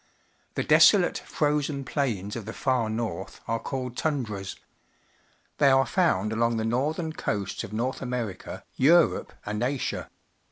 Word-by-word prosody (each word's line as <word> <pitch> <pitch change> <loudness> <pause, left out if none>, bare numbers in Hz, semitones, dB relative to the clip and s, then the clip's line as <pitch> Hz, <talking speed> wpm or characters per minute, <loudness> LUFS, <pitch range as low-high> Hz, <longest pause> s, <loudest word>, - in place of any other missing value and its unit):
The - - 0
de.soIate, - - +5
frozen 145 -2 -1
plains 115 -8 -2
of 115 -4 -5
the 115 - -6
far 125 -4 0
north 110 -5 -4
are 115 - 0
called 125 -1 -4
tundras. 115 -12 -2 1.0
They 140 - +6
are 135 0 +5
found 165 - +1
along 115 +1 +1
the 110 - -1
northern 155 +8 -1
coasts 100 -9 -3
of - - -8
North 120 +5 -2
.\merica, 125 -6 -4
Europe, 165 +5 +4
and 105 +1 -3
Asia. 130 +2 -2
125 Hz, 135 wpm, -27 LUFS, 110-140 Hz, 1.0 s, They